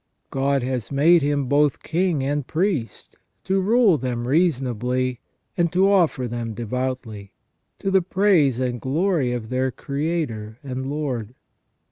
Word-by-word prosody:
God 135 0 +1
has 125 -2 -3
made 160 +5 +5
him 145 -1 0
both 145 +2 +2
king 170 -4 0
and 145 0 -1
priest, 160 - -2 0.3
to 190 0 +1
rule 215 -4 +4
them 120 -1 -3
reasonably, 130 -5 0 0.4
and 170 -3 +1
to 190 +2 +3
offer 165 -10 +2
them 115 -1 -4
devoutly, 120 -3 -4 0.4
to 195 - -2
the 190 0 +4
praise 175 - +2
and 125 -2 -2
glory 155 -1 +1
of 120 -3 -4
their 130 +1 0
Creator 140 -7 -3
and 130 -1 -4
Lord. 130 -6 -3
135 Hz, 135 wpm, -23 LUFS, 125-170 Hz, 0.4 s, made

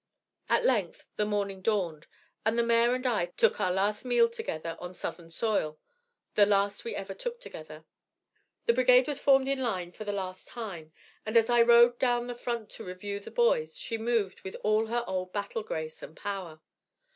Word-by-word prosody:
At - - +3
length - - +1
the 210 - 0
morning 200 -2 -2
dawned, 180 -7 -1 0.4
and 220 +2 +1
the 235 - +4
mare 235 +1 +3
and 255 +1 -5
I 215 -8 +1
took 175 - +1
our 180 - +2
last 200 +3 0
meal 240 -2 +4
together 165 -7 -4
on 180 +1 -8
Southern 170 -1 -6
soil 165 -4 -1 0.6
the 205 -1 +5
last 200 0 +1
we 230 - -4
ever 195 0 -5
took 475 - -5
together. 155 - -10 0.8
The 235 - +4
brigade 250 +1 +5
was 290 -2 -3
formed 270 -1 +4
in 275 0 0
line 185 -8 -2
for 215 - -8
the 205 - -3
last 185 -2 -5
time, 185 -10 -7 0.3
and 215 +2 +1
as 230 +1 +4
I 240 -1 +6
rode 235 +1 +6
down 240 -2 +2
the 245 - -4
front 235 -2 -4
to - - -8
review 200 +2 -5
the 200 - -10
boys 475 0 +1
she 230 - -4
moved 225 -4 0
with 190 - -7
all 215 +1 +2
her 240 +1 0
old 185 -1 -3
battle 205 +2 -3
grace 160 -6 -5
and 160 - -10
power. 185 -6 -5
215 Hz, 190 wpm, -29 LUFS, 185-240 Hz, 0.8 s, I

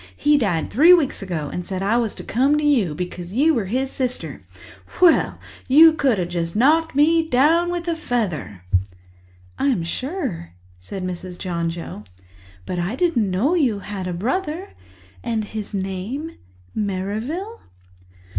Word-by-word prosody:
He 295 0 +3
died 195 - 0
three 330 +9 +7
weeks 305 -10 -1
ago 170 -7 -3
and 180 - -3
he - - -12
said 190 -1 -3
I 205 +4 +2
was 230 -3 -1
to - - -8
come 270 +6 +2
to 300 - -1
you, 235 - +2
because 180 +1 -6
you 300 +7 +4
were 230 -8 0
his 260 +7 -1
sister.' 255 -1 -3 0.6
Well, 355 -3 +4 0.3
you 315 +4 +8
could 275 -7 +2
just 170 -1 -3
have - - +1
knocked 315 +4 +3
me 320 +3 +4
down 320 +6 +3
with 350 -1 -3
a 335 - 0
feather!" 190 - -3 1.0
"I'm 265 -11 +1
sure," 250 - -4 0.3
said 185 - -7
Mrs. 180 0 -5
John 170 -3 -2
Joe. 165 -10 -7 0.6
"But 180 - -3
I 175 +7 -2
didn't 265 - +1
know 215 - +1
you 265 - +2
had 195 -2 -5
a - - -2
brother. 305 - -2 0.5
And 220 -2 -1
his 215 0 -6
name—Merrivale?" 205 - -5
225 Hz, 155 wpm, -22 LUFS, 185-300 Hz, 1.0 s, you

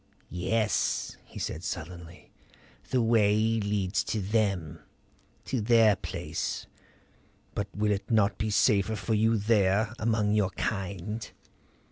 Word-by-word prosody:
"Yes," 105 +4 0
he - - -13
said 80 - -4
sullenly. 85 -2 -7 0.6
"The 125 -2 +2
way 110 -3 +4 0.2
leads 100 -2 0
to 110 - -1
them; 95 -6 -1 0.7
to 125 - -1
their 110 -1 +5
place. - - -4 0.9
But 100 - -2
will 105 +1 +1
it 100 -1 -2
not 110 -3 +2
be 110 - 0
safer 105 0 +3
for 110 - -2
you 110 +1 +3
there 105 0 +2
among 110 -2 +1
your 105 -3 +2
kind?" 100 +1 -3
105 Hz, 120 wpm, -28 LUFS, 95-110 Hz, 0.9 s, their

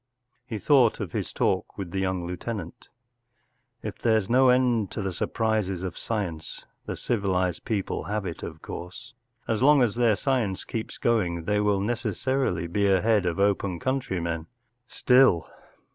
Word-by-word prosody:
” 125 0 -47
He 110 - -1
thought 125 +2 +4
of 100 -5 -4
his - - -3
talk - - -1
with 95 -4 -5
the 95 - -2
young 95 -2 -1
lieutenant 100 +5 -6 1.0
Al - - -2
If - - -12
there’s 110 -3 +1
no 130 +1 +5
end 125 -5 +3
to - - -4
the 95 -1 -2
surprises 105 -2 -1
of 90 -3 -4
science, 90 -8 -4 0.2
the - - -3
civilized 95 -6 -1
people 105 -5 -2
have 105 -1 -2
it, 85 -3 -5
of 80 -1 -8
course* 105 +10 -8 0.3
As 110 -1 0
long 145 0 +6
as 115 -4 +1
their 115 -2 +3
science 120 -7 -1
keeps 110 -1 -5
going 90 -8 0
they 105 +4 +1
will 105 -2 +2
necessarily 120 -3 -1
be 100 +4 +1
ahead 100 0 +3
of 85 +2 -1
open 100 -3 +1
country 130 -7 -1
men. 85 -1 -3 0.4
Still. 125 - +4
105 Hz, 165 wpm, -26 LUFS, 90-120 Hz, 1.0 s, long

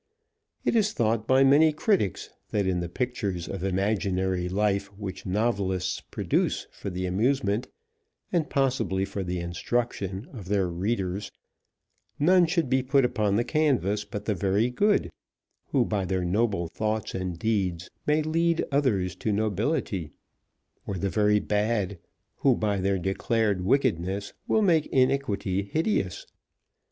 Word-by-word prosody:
It - - +2
is 215 -2 +2
thought 110 -1 0
by 130 +1 +5
many 145 +4 +6
critics 155 - 0 0.2
that 100 -2 0
in 95 -1 +1
the 85 -1 -3
pictures 100 -6 -2
of - - -5
imaginary 95 -2 0
life 100 +1 +1
which 100 -2 -6
novelists 95 -3 0
produce - - 0
for - - -6
the 90 0 -3
amusement, 105 +3 +1 0.6
and 170 -4 0
possibly 120 -8 +1
for 100 0 -4
the 90 0 -3
instruction 95 +3 -2
of 105 -8 -8
their 100 -2 +1
readers, 95 +2 -2 0.9
none 175 +3 +5
should 165 -3 +1
be 130 +1 +2
put 135 +1 +3
upon 105 -4 +1
the 115 - +2
canvas 125 - +1
but 105 -3 -7
the 105 - +1
very 100 +6 +1
good, 205 +11 +2 0.6
who - - +2
by 105 -3 -1
their 90 0 -1
noble 100 -2 +1
thoughts 110 +3 -2
and 90 -2 -3
deeds 90 -5 -1 0.2
may 150 +1 +3
lead 165 +2 +1
others 105 - +1
to 110 - -1
nobility, 105 - -1 0.8
or 100 - -2
the 95 +1 -1
very 105 -1 +3
bad, 105 -2 0 0.4
who 135 -3 +3
by 105 -3 0
their 95 +1 +1
declared 100 +1 0
wickedness 100 - 0
will 220 - +3
make 165 -6 +3
iniquity 130 -8 +1
hideous. 100 - -1
105 Hz, 140 wpm, -27 LUFS, 95-130 Hz, 0.9 s, many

